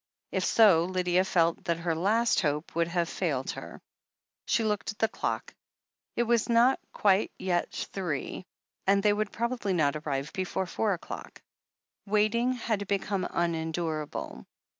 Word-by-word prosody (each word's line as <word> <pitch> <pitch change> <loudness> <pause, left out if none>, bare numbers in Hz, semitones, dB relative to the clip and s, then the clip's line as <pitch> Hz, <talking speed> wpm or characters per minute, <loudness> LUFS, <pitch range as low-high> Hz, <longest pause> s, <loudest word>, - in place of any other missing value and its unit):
If - - 0
so, 190 -7 +5
Lydia 180 0 +1
felt 170 -1 +1
that 170 -2 +1
her 170 0 -1
last 215 +8 +2
hope 150 0 -1
would 170 0 +1
have 170 0 0
failed 145 -8 -1
her. - - -9 0.6
She 230 - +2
looked 210 -2 -1
at 210 - -15
the 225 - +2
clock. 220 - -3 0.6
It 240 - +2
was 235 0 +1
not 240 +3 +5
yet - - -42
quite 200 0 +2 0.5
three, 180 -1 -3 0.4
and 200 0 +4
they 210 -1 +5
would 210 0 -1
probably 235 -4 -1
not 155 -4 +2
arrive 145 -1 -3
before 190 -1 -2
four 205 +3 0
o'clock. 175 - -8 0.7
Waiting 215 +4 +2
had 220 -5 -2
become 200 -1 -1
unendurable. 160 -2 -2
190 Hz, 145 wpm, -29 LUFS, 165-215 Hz, 0.7 s, so